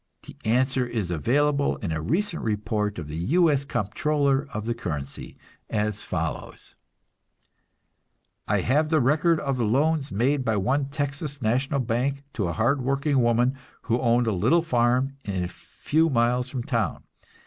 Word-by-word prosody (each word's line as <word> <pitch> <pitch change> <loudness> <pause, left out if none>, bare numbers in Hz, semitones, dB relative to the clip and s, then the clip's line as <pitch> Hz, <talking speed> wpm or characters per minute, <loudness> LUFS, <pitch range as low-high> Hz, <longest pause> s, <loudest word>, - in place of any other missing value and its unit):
The - - -12
answer 130 +3 +2
is 110 -7 -3
available 140 - +1
in 95 - -4
a 80 0 -2
recent 170 - -1
report 105 -1 -1
of 80 -4 -5
the 75 +1 -6 0.2
U. 170 -3 +5
S. 140 -1 +1
Comptroller 140 - 0
of 105 -3 -4
the 120 - 0
Currency, 75 -11 -6 0.3
as 105 -1 -1
follows: - - -5 1.7
"I - - +2
have 150 +5 +2
the 155 -1 +3
record 155 +5 +3
of 135 -2 -1
the 120 - 0
loans 140 +6 +1
made 130 +7 +1
by 110 -4 +1
one 130 +8 +1
Texas 145 0 -4
national 130 +4 0
bank 130 +4 -1
to 100 -7 -1
a 85 - -2
hard 140 - +1
working 135 +1 +1
woman 120 +2 +3 0.3
who 120 0 0
owned 120 0 +3
a 110 - +1
little 115 - +3
farm 125 -1 +1
a 95 -3 -1
few 160 - -1
miles 125 -1 +1
from 125 -3 -4
town. 115 -4 -1
125 Hz, 160 wpm, -25 LUFS, 110-140 Hz, 1.7 s, U